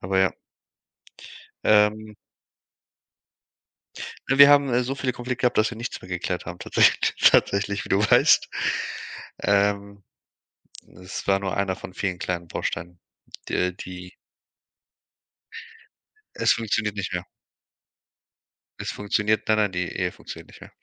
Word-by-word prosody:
Aber 95 +1 -1
ja. 95 0 +3 1.3
Ähm. 105 0 +3 2.1
Äh, 135 - +2
wir 140 0 +10
haben 140 -4 +4
so 135 +3 -3
viele 130 -2 -2
Konflikte 125 0 -5
gehabt, 125 - +2
dass 110 +1 +3
wir 115 - -8
nichts 120 +2 -6
mehr 90 - -13
geklärt 90 0 -3
haben 85 +1 -8
tatsäch - - +3 0.2
tatsächlich, 100 0 +3
wie - - -11
du 95 - +3
weißt. 105 - +4 0.9
Ähm, 100 0 0 1.0
es 90 - -7
war 95 0 +3
nur 95 -1 -3
1 95 -2 0
von 95 - -10
vielen 95 -3 -2
kleinen 85 -2 -4
Bausteinen, 85 +2 -5 0.5
der 90 0 0
die 90 0 -10 2.2
Es - - +3
funktioniert 110 -2 -2
nicht 95 -2 -4
mehr. 90 - -2 1.6
Es - - -3
funktioniert 105 +1 -1
nein, 110 - +3
nein, 105 -2 +2
die 90 -1 -2
Ehe 90 0 -2
funktioniert - - -11
nicht - - -17
mehr. - - -13
100 Hz, 130 wpm, -24 LUFS, 90-110 Hz, 2.2 s, wir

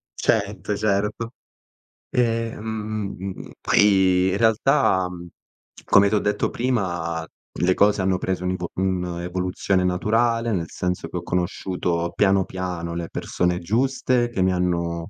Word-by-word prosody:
Certo, 105 - 0
certo. 105 +3 -1 0.8
Ehm, 115 -2 0
m 110 -2 -4
m 95 +2 -5
m - - -9
m - - -15
poi 95 -2 +4
in 100 - 0
realtà, 110 -4 +3
mhmm, 85 -1 -9 0.6
come 100 0 +5
ti 110 - +1
ho - - +3
detto 105 - 0
prima, 85 -9 -1 0.4
le 90 +1 +4
cose 100 0 +3
hanno 95 0 +1
preso 95 0 -2
un 90 - 0
ivo 90 -2 -3
un'evoluzione 90 0 -1
naturale, 115 +5 +1
nel 85 -5 -2
senso 90 0 -3
che - - -5
ho - - -5
conosciuto, 90 -1 -1
piano 95 -2 +3
piano, 90 -2 -4
le 85 -1 -4
persone 90 0 -1
giuste 120 +4 +1
che 100 -6 -2
mi 95 0 +3
hanno 85 -2 -1
95 Hz, 145 wpm, -23 LUFS, 90-110 Hz, 0.8 s, come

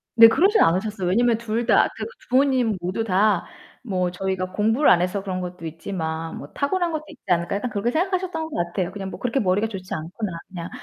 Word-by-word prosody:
네, 230 -1 +10
그러진 385 - +4
않으셨어요. 190 +2 +1
왜냐면 235 +4 +3
둘 230 +1 -2
다 - - +5
그 - - -4 0.2
부모님 255 -4 +3
모두 185 +5 -2
다 200 -2 +2 0.4
뭐 185 -5 0
저희가 185 0 -3
공부를 225 +8 +3
안 175 - +6
해서 185 +3 -1
그런 185 -2 -3
것도 180 -1 -7
있지만 160 -1 -4
뭐 140 - -8
'타고난 340 +4 0
것도 310 -1 -3
있지 - - -14
않을까?' 175 +2 +1
약간 245 +5 -3
그렇게 215 +2 -1
생각하셨던 355 0 -1
것 - - -7
같아요. 175 +1 -2
그냥 195 -2 -5
뭐 - - -8
'그렇게 250 +2 0
머리가 200 +2 +1
좋지 195 -4 -7
않구나.' 185 +6 -4 0.2
그냥. 175 -2 -7
200 Hz, 440 characters per minute, -23 LUFS, 180-240 Hz, 0.4 s, 네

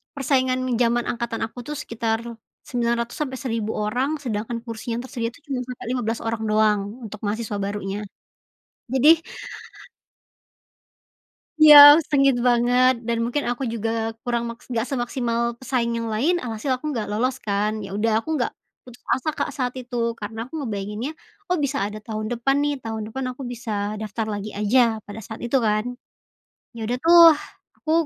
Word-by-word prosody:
persaingan 260 -2 +1 0.2
zaman 240 0 +2
angkatan 235 -1 -3
aku 235 +2 -10
tuh 300 - -4
sekitar 230 -5 -2 0.5
900 235 -1 -1
sampai 260 -3 -3
1000 225 -4 -2
orang, 250 +8 0
sedangkan 230 -2 -3
kursi 230 +1 -6
yang 240 - -3
tersedia 235 -3 -3
tuh 315 - -19
cuma 265 -3 -2
sampai 250 -1 -8
15 235 -2 -1
orang 225 -1 -2
doang 215 -1 +3 0.3
untuk 215 0 -8
mahasiswa 210 0 -2
barunya. 200 0 -3 0.9
Jadi 310 +6 +5 2.4
Iya, 300 -1 +11 0.3
sengit 275 -2 +4
banget, 245 +1 +4
dan 235 -1 0
mungkin 275 +5 -1
aku 245 +2 -3
juga 225 0 -2 0.3
kurang 235 -1 -1
mak 235 0 -8
nggak 230 0 -1
semaksimal 240 -3 -2 0.2
pesaing 245 -3 -1
yang 230 - -3
lain, 330 +11 +2
alhasil 230 +1 -4
aku 305 - -7
nggak 215 -3 -3
lolos 250 +5 0
kan, 210 +1 0
ya 195 - -8
udah 225 +1 +1
aku - - -14
nggak 245 - -1 0.3
putus 245 -1 -14
asa, 310 +4 -2
Kak, - - -2
saat 250 -2 -1
itu. 250 -1 -7 0.2
Karena 220 +2 -6
aku 275 - -15
ngebayanginnya, 210 +3 -4 0.4
"Oh, 360 - +2
bisa 275 -3 -1
ada 210 +1 -6
tahun 215 +1 -5
depan 245 +3 +1
nih, 290 0 +1
tahun 220 -1 -4
depan 265 +2 -4
aku 270 - -9
bisa 235 -2 -6 0.3
daftar 215 +1 -4
lagi 205 +1 -6
aja," 220 +1 +2
pada 205 +2 -9
saat 220 +1 -9
itu 240 +3 +2
kan. 215 +1 +1 0.9
Ya 220 - -4
udah 245 +3 -1
tuh 340 +1 +7 0.6
aku 315 - -2
235 Hz, 165 wpm, -23 LUFS, 220-260 Hz, 2.4 s, Iya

